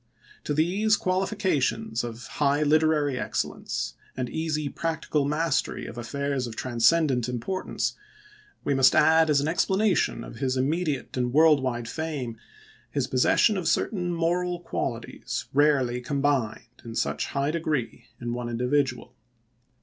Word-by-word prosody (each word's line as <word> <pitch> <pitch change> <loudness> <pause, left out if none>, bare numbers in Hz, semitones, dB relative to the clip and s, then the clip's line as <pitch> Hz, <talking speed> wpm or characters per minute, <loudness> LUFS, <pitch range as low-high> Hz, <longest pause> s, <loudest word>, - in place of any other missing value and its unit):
To 150 - -1
these 200 +7 +2
qualifications 185 - 0
of 120 0 -6
high 145 +1 +1
literary 150 -3 +2
excellence, - - -3 0.2
and 125 -2 -3
easy 155 -2 -1
practical 160 -1 -1
mastery 150 +1 0
of - - -8
affairs 135 +2 -2
of 115 - -8
transcendent 125 +1 +2
importance, 125 +11 -2 0.7
we 140 - +1
must 135 -1 +5
add, 160 0 +5
as 145 -2 +4
an 145 - -1
explanation 190 +4 +1
of - - -10
his 130 0 -1
immediate 150 +1 -1
and 125 -1 0
world 155 0 +5
wide 120 -3 -2
fame, 140 -8 -4 0.5
his - - -1
possession 160 - +3
of 180 -3 -2
certain 175 +1 0
moral 175 +1 0
qualities 120 -8 -4
rarely 135 -4 +3
combined, 135 -5 0 0.2
in 115 -2 -8
such - - -1
high 140 +1 -1
degree, 150 -7 -2
in 120 0 -3
one 120 0 -4
individual. 125 +2 0
145 Hz, 135 wpm, -26 LUFS, 125-160 Hz, 0.7 s, must